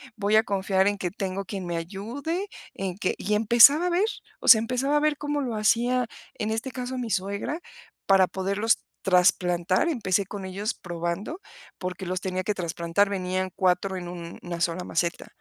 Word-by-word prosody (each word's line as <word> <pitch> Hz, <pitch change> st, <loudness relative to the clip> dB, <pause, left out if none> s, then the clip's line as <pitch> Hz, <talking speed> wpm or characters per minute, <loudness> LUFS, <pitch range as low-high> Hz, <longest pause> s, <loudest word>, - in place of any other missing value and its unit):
voy 210 Hz, -1 st, +1 dB
a 220 Hz, -, +6 dB
confiar 195 Hz, -1 st, +1 dB
en 205 Hz, 0 st, +1 dB
que 180 Hz, -, -1 dB
tengo 195 Hz, +1 st, -4 dB
quien 195 Hz, -3 st, -5 dB
me 170 Hz, -1 st, -2 dB
ayude, 235 Hz, -, -4 dB, 0.3 s
en 190 Hz, -2 st, -4 dB
que" 195 Hz, -, -1 dB
y 210 Hz, -, -2 dB
empezaba 235 Hz, +10 st, +6 dB
a -, -, +1 dB
ver 355 Hz, +4 st, +2 dB, 0.4 s
o -, -, -6 dB
sea, 220 Hz, -, +10 dB
empezaba 255 Hz, +6 st, 0 dB
a -, -, +4 dB
ver 300 Hz, -1 st, +1 dB
cómo 290 Hz, 0 st, -2 dB
lo 245 Hz, -5 st, -3 dB
hacía, 240 Hz, +4 st, +2 dB, 0.3 s
en 215 Hz, +1 st, -2 dB
este 225 Hz, +4 st, -2 dB
caso, 255 Hz, 0 st, -4 dB
mi 240 Hz, -2 st, -3 dB
suegra 200 Hz, -, -2 dB, 0.5 s
para 195 Hz, -1 st, +5 dB
poderlos 195 Hz, +5 st, 0 dB, 0.2 s
trasplantar, 180 Hz, -, +3 dB
empecé 200 Hz, -, 0 dB
con 200 Hz, -1 st, -6 dB
ellos 200 Hz, +5 st, -3 dB
probando, 175 Hz, -, -4 dB, 0.4 s
porque 185 Hz, 0 st, -5 dB
los 185 Hz, +1 st, -2 dB
tenía 185 Hz, 0 st, -2 dB
que 210 Hz, -, 0 dB
trasplantar, 170 Hz, +2 st, 0 dB
venían 185 Hz, -1 st, -2 dB
4 185 Hz, 0 st, +1 dB
en 175 Hz, -1 st, -6 dB
una 170 Hz, 0 st, -7 dB
sola 175 Hz, +1 st, 0 dB
maceta, 170 Hz, 0 st, -2 dB
195 Hz, 180 wpm, -26 LUFS, 185-230 Hz, 0.5 s, sea